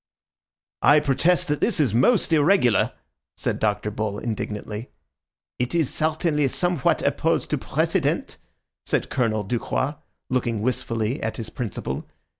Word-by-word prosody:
"I 145 +1 +6
protest 165 +6 +2
that 150 - 0
this 215 -7 +1
is 135 -9 +2
most 165 - +3
irregular," 150 - +4 0.4
said - - -2
Dr. 105 0 0
Bull 105 -1 -3
indignantly. 105 0 -4 0.7
"It 125 +5 -1
is 160 -6 +1
certainly 155 -2 +1
somewhat 175 +1 +1
opposed - - +1
to - - +1
precedent," - - 0 0.5
said - - -1
Colonel 110 -4 +1
Ducroix, 130 +7 -2 0.3
looking 120 -4 0
wistfully 115 0 -1
at 110 - -3
his 110 -2 -6
principal. 115 -7 -4
125 Hz, 125 wpm, -24 LUFS, 110-150 Hz, 0.7 s, I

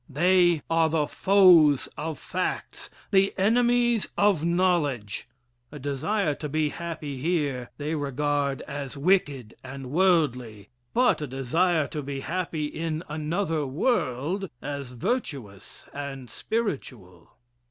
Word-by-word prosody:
They 175 +2 +3
are 165 -1 +2
the 155 -1 +1
foes 175 -6 +5
of 160 0 -4
facts 185 0 -4 0.2
the 195 -1 +3
enemies 240 +2 +3
of 200 -6 +3
knowledge. 165 - 0 0.4
A 150 - -8
desire 145 +6 -1
to 150 +1 -6
be 155 +1 0
happy 160 -4 -6
here, 140 -5 -1
they 150 +2 -3
regard 145 -1 -1
as 140 -1 -6
wicked 140 - +1
and 130 -1 -8
worldly 135 - +1 0.3
but 245 -8 +3
a 150 - -3
desire 155 +6 +1
to 150 - -4
be 140 -1 -5
happy 165 -1 -2
in 160 +1 -3
another 155 0 -1
world, 165 - -1
as 140 -1 -6
virtuous 125 - -4
and 135 -4 -7
spiritual. 130 - -5
150 Hz, 120 wpm, -26 LUFS, 135-180 Hz, 0.4 s, foes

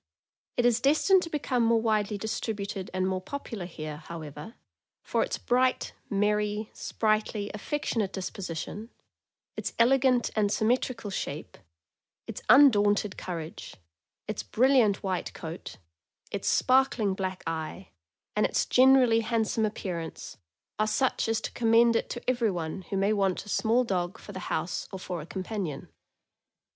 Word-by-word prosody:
It 245 - +2
is 240 -1 +3
destined 315 +8 +4
to 335 - -5
become 270 -6 0
more 230 0 +4
widely 215 -2 0
distributed 200 -2 -4
and 185 0 0
more 185 -1 -1
popular 225 -4 -6
here, 155 -3 -6
however, 160 - -9 0.5
for - - 0
its - - -1
bright, 255 +1 +1 0.2
merry, 210 +1 0
sprightly, 215 -1 -1
affectionate 215 -3 -2
disposition, 190 +2 -5 0.7
its - - -4
elegant 250 0 +4
and 205 -2 +2
symmetrical 230 -1 0
shape, - - -5 0.7
its - - -7
undaunted 210 -7 +5
courage, 165 -3 -6 0.5
its 215 -1 -3
brilliant 245 -5 +3
white 185 -2 -2
coat, 165 +1 -7 0.5
its - - -3
spark 265 +1 +3
ling 205 -4 +1
black 190 -1 -4
eye, 165 +3 -4 0.5
and - - +3
its - - 0
generally 255 -3 +5
handsome 220 -1 0
appearance 175 -6 -5 0.4
are 215 - +2
such 235 +4 +1
as 225 - +1
to - - -4
commend 230 0 +4
it - - 0
to 240 - -6
everyone 195 -9 0
who 195 - -1
may 200 +2 +2
want 195 -2 0
a - - -11
small 230 +4 +2
dog 180 -5 -2
for - - -11
the 190 - -6
house 170 +3 -2
or 190 - -5
for 180 -2 -5
a 150 - -10
companion. 185 -6 -4
210 Hz, 140 wpm, -28 LUFS, 190-235 Hz, 0.7 s, undaunted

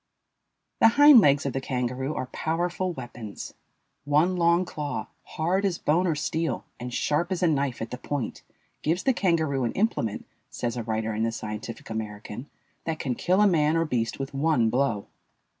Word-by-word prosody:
The - - +7
hind 290 -3 +10
legs 140 -5 +4
of 135 - -1
the 135 - -2
kangaroo 130 +2 -2
are - - -2
powerful 175 +6 -2
weapons. 120 - -8 0.5
One 150 +6 +2
long 170 +1 +3
claw, 145 -10 -4
hard 180 +5 -1
as 190 -4 +1
bone 170 +5 +2
or 165 - +1
steel, 155 -2 -2
and 125 +1 -5
sharp 160 +8 0
as 185 -1 -1
a - - +5
knife 140 -6 0
at 115 - -7
the 125 - -5
point, 145 -3 -4 0.4
gives 165 +4 0
the 265 - +3
kangaroo 160 - +1
an 115 - -1
implement, 190 - -1 0.2
says 120 -1 -3
a 120 - -2
writer 110 0 -2
in 110 - -2
the 115 0 +1
Scientific 110 +1 -6
American, 110 +4 -6 0.4
that 160 -1 -2
can 130 -4 -2
kill 185 - +2
a 210 - +6
man 160 -3 +3
or 165 - +2
beast 115 -6 -1
with 135 +1 -5
one 135 -6 +2
blow. 125 -6 0
145 Hz, 180 wpm, -26 LUFS, 120-170 Hz, 0.5 s, hind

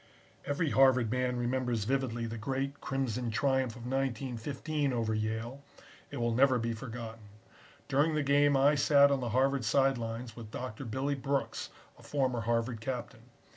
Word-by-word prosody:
Every 145 +1 0
Harvard 130 -4 +4
man 125 0 0
remembers 120 -2 -1
vividly 120 -1 -1
the 115 0 -5
great 135 +4 -3
Crimson 125 -3 -2
triumph 130 0 +1
of 120 - -10
1915 135 +3 -2
over 115 -2 0
Yale. 110 +5 -3 0.5
It - - -7
will 120 -1 0
never 130 +1 +4
be 115 0 -1
forgotten. 115 -2 -8 0.6
During 150 +3 +2
the 150 - +1
game 145 0 +4
I 140 +2 +5
sat 140 0 +5
on 140 - +2
the 120 -2 -3
Harvard 135 +2 +2
side 135 +3 +2
lines 115 0 -5
with 115 -3 -9
Doctor 125 +2 -6
Billy 130 +5 -1
Brooks, 140 0 -2 0.3
a - - -14
former 130 -4 -1
Harvard 115 0 -1
captain. 120 -1 -6
125 Hz, 160 wpm, -31 LUFS, 115-135 Hz, 0.6 s, I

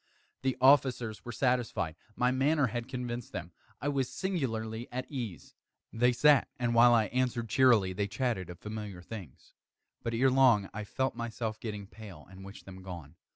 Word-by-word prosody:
The 130 -1 0
officers 130 -4 +3
were 120 - -6
satisfied. 115 - 0 0.2
My 125 +1 +2
manner 140 +3 +2
had 120 0 -3
convinced 125 -2 -5
them. 90 -1 -5 0.3
I - - -3
was 135 -3 0
singularly 120 - -3
at 130 +1 -3
ease. 120 -10 -6 0.4
They 125 +2 +3
sat, 145 +3 +5
and 120 -2 0
while 120 +1 +7
I 110 -2 +3
answered 125 -3 -1
cheerily, 110 -6 +4
they 100 +2 -1
chatted 105 -5 -2
of 90 - -8
familiar 105 -2 -7
things. 95 - -10 0.5
But, 115 0 -2
ere 130 +3 +3
long, 125 -7 +4
I 105 0 -5
felt 130 +5 -1
myself 115 -2 -4
getting 105 -3 -5
pale 100 -6 -12
and 95 0 -11
wished 100 +1 -11
them 95 -1 -10
gone. 85 -5 -9
115 Hz, 170 wpm, -31 LUFS, 100-130 Hz, 0.5 s, while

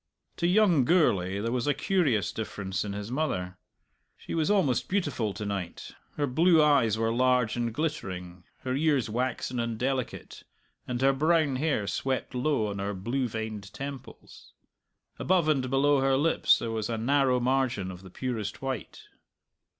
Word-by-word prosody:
To 170 - +1
young 180 -6 +4
Gourlay 100 - +2
there 115 +3 -2
was 125 +1 -1
a 145 - +2
curious 140 - +1
difference 100 -3 -4
in 100 -1 -4
his 105 +2 -6
mother. 95 -11 -2 0.6
She - - -8
was 160 0 +1
almost 185 - +2
beautiful 145 - -1
to 105 - -5
night. 100 -4 -5 0.3
Her 145 - +1
blue 160 +6 +4
eyes 140 -8 +4
were 115 0 0
large 125 -2 +2
and 120 -1 -1
glittering, 95 - -4 0.2
her 130 - -2
ears 140 -5 +1
waxen 125 +1 -2
and 115 -1 -2
delicate, 130 +1 -3 0.5
and 125 -1 -2
her 135 0 +5
brown 155 -1 +2
hair 140 -7 0
swept 130 +7 -2
low 125 -2 +1
on 100 -1 -5
her 100 +1 -3
blue 125 +7 -1
veined 110 -3 -5
temples. 140 -1 -9 0.7
Above 180 -3 +2
and 135 -4 +1
below 140 +1 +3
her 135 0 +3
lips 160 +4 +3
there 115 - -4
was 110 -1 -3
a 115 - -1
narrow 130 +2 +2
margin 125 -6 0
of 90 -1 -10
the 95 - -12
purest 115 -1 -4
white. 135 -5 -5
125 Hz, 165 wpm, -28 LUFS, 110-145 Hz, 0.7 s, her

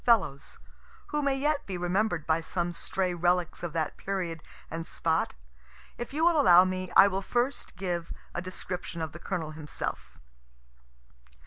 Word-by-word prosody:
Fellows, 195 - +2 0.5
who 300 0 0
may 275 -1 +1
yet 295 +1 0
be 190 -2 -3
remember'd 175 -1 0
by 160 0 +2
some 175 +1 -1
stray 185 +1 -1
relics 175 0 +1
of 175 - -3
that 160 -2 -1
period 180 -5 -3 0.3
and 165 0 -4
spot. 160 - 0 0.6
If 240 - -6
you 310 +4 +1
will 335 -3 +5
allow 180 -1 +8
me, 185 -1 -3
I 195 - +10
will 195 0 -1
first 245 +6 -1
give 175 -2 -3 0.2
a 175 - -2
description 180 -1 -5
of 160 - -4
the 170 - -10
Colonel 160 -2 -3
himself. 155 -1 -5
180 Hz, 155 wpm, -29 LUFS, 165-200 Hz, 0.6 s, I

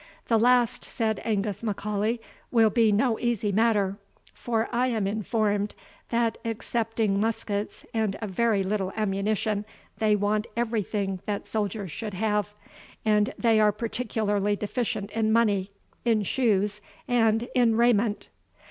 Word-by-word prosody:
"The 225 -2 +4
last," 245 0 +3
said 220 -2 -1
Angus 205 -2 -1
M'Aulay, 210 +1 -1 0.3
"will 225 -3 +4
be 225 -1 +4
no 220 +2 +2
easy 230 -4 0
matter; 205 -2 +2 0.4
for 230 -1 -1
I 245 +2 +2
am 225 -5 0
informed, 210 0 0 0.3
that, 230 -1 0
excepting 225 -2 -1
muskets 210 -1 -2
and 220 -3 0
a 220 - -3
very 210 0 +1
little 190 -1 -1
ammunition, 205 0 0 0.4
they 215 -1 +3
want 210 +2 0
everything 210 -4 -1
that 205 -1 -2
soldiers 205 -3 -2
should 205 +6 -5
have; 210 0 0 0.5
and 210 -1 +3
they 225 -2 +3
are 210 -1 +5
particularly 210 -2 -1
deficient 210 -1 -3
in 220 -1 +1
money, 210 -4 +2 0.3
in 225 -3 +2
shoes, 210 -2 +1 0.3
and 230 -2 +2
in 240 -3 +3
raiment." 230 -2 +2
215 Hz, 130 wpm, -26 LUFS, 205-230 Hz, 0.5 s, are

